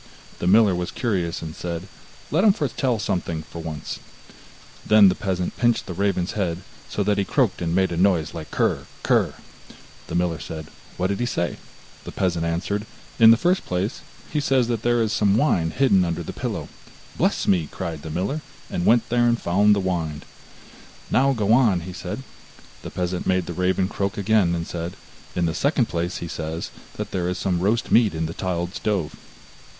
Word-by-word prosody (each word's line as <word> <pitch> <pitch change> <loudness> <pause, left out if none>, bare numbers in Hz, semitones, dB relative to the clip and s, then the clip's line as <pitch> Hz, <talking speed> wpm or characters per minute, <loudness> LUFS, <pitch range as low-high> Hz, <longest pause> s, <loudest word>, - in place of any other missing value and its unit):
The 85 - -1
miller 105 0 +6
was 90 0 -2
curious, 90 -9 -2
and 80 -1 -6
said: 85 +1 -5 0.4
'Let 165 +6 +3
him 210 -3 +6
foretell 130 - 0
something 85 -5 -2
for 85 +2 -9
once.' 80 -2 -5 0.8
Then 105 -2 +7
the - - +2
peasant 90 -2 -2
pinched 120 -1 +2
the 90 - -5
raven's 95 -1 0
head, 90 -4 -2 0.3
so 105 - -1
that 105 0 +1
he - - +2
croaked - - +1
and 85 0 0
made 95 -1 +2
a 85 - -2
noise 90 -4 +2
like 80 -2 -7
krr, - - 0 0.2
krr. - - +2 0.7
The - - -4
miller 85 -2 0
said: 80 -1 -7 0.3
'What 90 - 0
did 100 - -1
he 120 - 0
say?' 85 -7 -1 0.5
The - - -7
peasant 85 -3 0
answered: 100 +6 -2 0.3
'In 115 -1 +9
the 115 - +8
first 180 +7 +2
place, 95 +8 -2 0.3
he 150 - +2
says 135 -4 +2
that 115 -3 -1
there 120 0 +2
is 110 -1 -1
some 105 -1 +3
wine 90 - +2
hidden 100 -3 +3
under 85 0 -2
the - - -6
pillow.' - - -4 0.5
'Bless - - +1
me!' 85 -5 +3
cried 85 -5 -5
the 80 - -7
miller, 95 - -2 0.3
and 85 - -1
went 120 0 +4
there 120 0 +3
and 120 0 +2
found 100 +4 +4
the - - 0
wine. 85 -5 -2 0.9
'Now 135 +1 +4
go 110 -3 +2
on,' 110 -9 +4
said - - -5
he. - - -9 0.6
The - - -7
peasant 90 0 -3
made 95 -1 +2
the 85 - -5
raven 90 +1 +1
croak 100 0 -2
again, 100 -4 +3
and 85 0 -3
said: 85 +1 -5 0.4
'In 90 - +1
the 80 - 0
second 135 - +1
place, 85 +2 -2
he 85 - -5
says 80 0 -4 0.2
that - - -5
there 90 -1 -1
is 90 - -2
some 90 -3 0
roast 105 +6 0
meat 110 -7 +5
in 80 +1 -1
the 80 - -4
tiled 90 -1 -2
stove. 95 -9 -1
95 Hz, 195 wpm, -23 LUFS, 85-110 Hz, 0.9 s, In